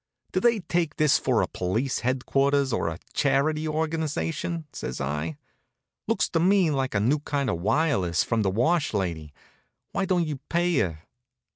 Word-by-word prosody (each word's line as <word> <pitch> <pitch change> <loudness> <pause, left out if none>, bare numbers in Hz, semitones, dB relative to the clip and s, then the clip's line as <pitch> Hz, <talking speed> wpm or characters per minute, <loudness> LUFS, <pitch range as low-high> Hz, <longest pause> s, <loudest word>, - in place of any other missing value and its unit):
"Do - - +1
they 235 -3 +3
take 170 -3 -1
this 150 -2 +3
for - - +2
police 110 +9 -1
headquarters, 135 +2 +1
or - - 0
a 80 0 -3 0.2
Charity 150 +3 +1
Organization?" 160 +1 -2
says 65 - -5
I. 75 +3 -3 0.7
"Looks - - +1
to - - +1
me 185 -1 +4
like 135 -4 -1
a - - +3
new 130 +9 +2
kind 140 -4 -1
of 85 - -3
wireless 100 - +2
from 115 -2 0
the 100 - +2
wash 145 - +1
lady. 85 -6 -2 0.6
Why 195 - 0
don't 180 -2 +1
you 150 -3 -3
pay 175 -2 +2
her?" 80 -5 -2
140 Hz, 160 wpm, -26 LUFS, 100-160 Hz, 0.7 s, me